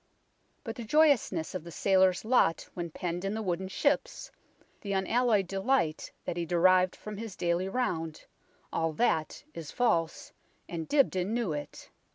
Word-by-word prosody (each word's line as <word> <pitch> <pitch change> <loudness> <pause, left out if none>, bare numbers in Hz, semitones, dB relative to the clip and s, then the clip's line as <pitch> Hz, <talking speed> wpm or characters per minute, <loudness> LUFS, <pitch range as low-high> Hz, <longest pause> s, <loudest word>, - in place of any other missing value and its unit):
But 225 -4 -5
the 240 - -5
joyousness 240 - +2
of 185 -4 -4
the 170 - -9
sailor's 190 +2 +2
lot 220 -9 +2
when 175 -1 -4
penned 175 +2 -4
in 195 +2 -2
the 220 - -2
wooden 185 0 -2
ships, 285 +9 -1 0.5
the 200 -1 -3
unalloyed 210 +2 +2
delight 195 -3 0
that 170 - -3
he 170 - -1
derived 180 +2 +3
from 210 -1 -8
his 220 -3 -6
daily 175 +2 0
round 170 -9 -2 0.5
all 165 -1 0
that 160 - 0
is 160 -3 -7
false, 170 -10 0 0.3
and 165 -2 -5
Dibdin 220 -8 +2
knew 230 -9 -1
it. 145 0 -7
185 Hz, 155 wpm, -30 LUFS, 170-225 Hz, 0.5 s, derived